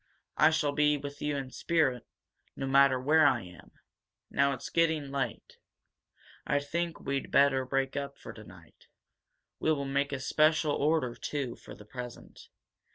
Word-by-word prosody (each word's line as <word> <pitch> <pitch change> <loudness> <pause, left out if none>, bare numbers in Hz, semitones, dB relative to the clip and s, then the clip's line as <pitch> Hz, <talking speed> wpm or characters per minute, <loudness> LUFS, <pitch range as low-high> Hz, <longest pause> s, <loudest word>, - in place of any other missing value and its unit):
I 155 - +5
shall 155 -2 +1
be 150 0 +2
with 145 0 -8
you 150 -1 -1
in 135 -2 -5
spirit, 135 -8 0 0.5
no 135 - -4
matter 135 -1 +4
where 155 +3 +4
I 120 -6 +1
am. 90 -1 -14 0.6
Now 140 0 +2
it's, 135 - -6
getting 160 -4 +1
late. 135 -5 -4 0.9
I - - 0
think 165 +4 -3
we'd 140 -1 -3
better 135 -2 +3
break 135 +1 -1
up 140 -1 -4
for - - -10
tonight. - - -16 0.7
We 160 - +1
will 140 -3 -1
make 140 +1 -1
a 140 - -3
special 155 +2 +2
order, 145 -4 +1
too, 135 -3 -4
for - - -12
the 105 - -14
present. 125 +2 -10
140 Hz, 160 wpm, -30 LUFS, 135-150 Hz, 0.9 s, I